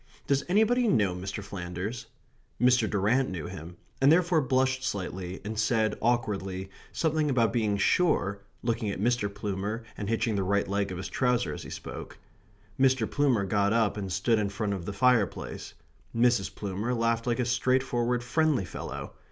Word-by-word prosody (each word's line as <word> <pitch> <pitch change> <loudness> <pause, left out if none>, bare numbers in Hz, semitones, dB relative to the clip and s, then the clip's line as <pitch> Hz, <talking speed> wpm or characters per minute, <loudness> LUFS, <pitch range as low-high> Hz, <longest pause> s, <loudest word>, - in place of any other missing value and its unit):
"Does 140 0 +1
anybody 225 +5 +3
know 105 - +3
Mr. 95 +3 -5
Flanders?" 100 +5 -5 0.5
Mr. 125 -2 +4
Durrant 110 +7 +2
knew 90 -5 -5
him; 85 -1 -8 0.2
and 135 +2 +6
therefore 175 -1 +4
blushed 130 0 +1
slightly, 95 -4 -4
and 110 +1 -3
said, 110 0 +2
awkwardly, 95 -5 -1 0.2
something 155 -2 +1
about 115 -4 +2
being 110 -4 +1
sure 100 - +2 0.2
looking 115 -2 -1
at 100 - -4
Mr. 115 -1 +1
Plumer 105 +3 -3
and 105 -1 -4
hitching 115 -1 0
the 100 - +1
right 100 +1 +1
leg 100 0 -1
of 90 - -4
his 95 - -4
trouser 125 - +1
as - - -7
he - - -9
spoke. - - -8 0.6
Mr. 130 -4 +3
Plumer 130 -8 +2
got 100 +1 +2
up 115 -3 +2
and 100 -3 -4
stood 105 +5 +2
in 105 -1 0
front 100 0 -2
of 95 -4 -5
the - - -3
fireplace. 125 -2 0 0.4
Mrs. 120 -4 +2
Plumer 105 +5 -2
laughed 115 0 0
like 120 -1 +1
a 125 - +1
straightforward 125 -1 +1
friendly 150 - +1
fellow. - - -7
110 Hz, 170 wpm, -28 LUFS, 100-125 Hz, 0.6 s, and